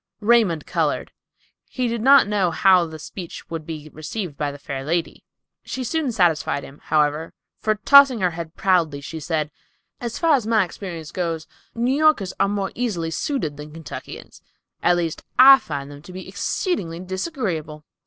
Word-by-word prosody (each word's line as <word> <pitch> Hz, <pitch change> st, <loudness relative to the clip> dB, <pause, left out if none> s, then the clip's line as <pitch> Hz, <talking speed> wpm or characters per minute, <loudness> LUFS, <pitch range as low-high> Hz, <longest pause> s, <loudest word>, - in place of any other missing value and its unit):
Raymond 210 Hz, -8 st, +3 dB
colored. -, -, -1 dB, 0.6 s
He 255 Hz, -2 st, -1 dB
did 235 Hz, -1 st, -2 dB
not 270 Hz, -1 st, +6 dB
know 205 Hz, -4 st, +1 dB
how 180 Hz, 0 st, +4 dB
the 160 Hz, 0 st, -8 dB
speech 170 Hz, +3 st, -9 dB
would 160 Hz, -2 st, -5 dB
be 155 Hz, -2 st, -6 dB
received 160 Hz, +1 st, -5 dB
by 145 Hz, 0 st, -2 dB
the 140 Hz, -, -9 dB
fair 140 Hz, -1 st, -6 dB
lady. 165 Hz, +3 st, -2 dB, 0.4 s
She 260 Hz, -, -5 dB
soon 300 Hz, 0 st, -1 dB
satisfied 170 Hz, -8 st, +1 dB
him, 140 Hz, +2 st, -12 dB
however; 150 Hz, +1 st, +1 dB, 0.3 s
for 215 Hz, 0 st, +1 dB
tossing 275 Hz, +2 st, +6 dB
her 180 Hz, -1 st, +2 dB
head 165 Hz, -1 st, -7 dB
proudly, 170 Hz, -7 st, +1 dB
she 160 Hz, +3 st, -7 dB
said, 155 Hz, -1 st, -2 dB, 0.5 s
"As 235 Hz, -2 st, -4 dB
far 330 Hz, -2 st, +3 dB
as 250 Hz, -6 st, +1 dB
my 220 Hz, -2 st, +4 dB
experience 170 Hz, -3 st, -8 dB
goes, 165 Hz, -3 st, -3 dB, 0.3 s
New 240 Hz, +3 st, +1 dB
Yorkers 300 Hz, -11 st, +3 dB
are 195 Hz, -, +3 dB
more 200 Hz, -1 st, -2 dB
easily 185 Hz, -10 st, -2 dB
suited 160 Hz, -, -2 dB
than 150 Hz, +1 st, -9 dB
Kentuckians; 160 Hz, -1 st, -9 dB, 0.4 s
at 175 Hz, 0 st, +3 dB
least, 165 Hz, -2 st, -3 dB
I 270 Hz, +1 st, +10 dB
find 140 Hz, -2 st, -6 dB
them 145 Hz, 0 st, -11 dB
to 180 Hz, -, -12 dB
be 185 Hz, 0 st, -8 dB
exceedingly 175 Hz, -, -2 dB
disagreeable." 185 Hz, -, -4 dB
175 Hz, 170 wpm, -22 LUFS, 155-225 Hz, 0.6 s, I